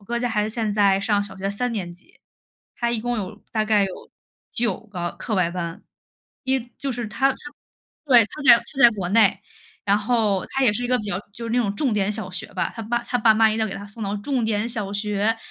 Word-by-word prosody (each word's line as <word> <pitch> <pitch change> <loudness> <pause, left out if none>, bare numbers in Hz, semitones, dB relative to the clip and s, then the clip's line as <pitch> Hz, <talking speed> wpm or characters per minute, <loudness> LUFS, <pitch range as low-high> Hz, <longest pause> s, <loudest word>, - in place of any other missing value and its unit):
我 - - -19
哥 235 +4 -2
家 245 0 -1
孩 210 -2 0
子 215 - -1
现 220 -3 -1
在 200 -2 +4
上 205 0 +1
小 200 - -6
学 195 +1 -3
3 240 +5 -1
年 185 -6 -4
级， 180 - -21 0.6
她 235 -1 -1
一 235 - -1
共 240 +1 -2
有 205 +1 -5
大 215 -1 +1
概 210 -2 +3
有 190 - -8 0.4
9 230 -5 -1
个 180 -6 -5
课 220 -4 -4
外 180 -2 +2
班， 170 -2 -5 0.6
一 265 0 +2 0.2
就 275 - -3
是 240 -2 -3
她 270 +5 +2
她 - - -4 0.7
对， 245 -6 +6
她 300 +8 -9
在 240 -4 +9
她 - - -11 0.2
在 240 - +9
国 195 -5 -4
内， 205 -3 +4 0.4
然 200 +1 +3
后 210 -4 +1
她 270 - 0
也 230 -5 +5
是 230 - -3
一 - - 0
个 250 +1 +2
比 215 - -6
较 190 -2 -2
就 230 +3 -8
是 230 - -4
那 245 - +2
种 205 -4 0
重 270 -7 +1
点 205 -1 +1
小 200 -3 -4
学 180 - -6
吧， 185 - -1
她 225 - -6
爸 235 +2 0
她 245 - -1
爸 220 -1 +5
妈 220 0 +5
要 220 0 0
给 195 - -5
她 200 - -7
送 210 +2 -10
到 200 +1 -2
重 245 +3 -1
点 215 0 0
小 210 -4 -1
学， 210 +1 0
215 Hz, 260 characters per minute, -23 LUFS, 200-235 Hz, 0.7 s, 在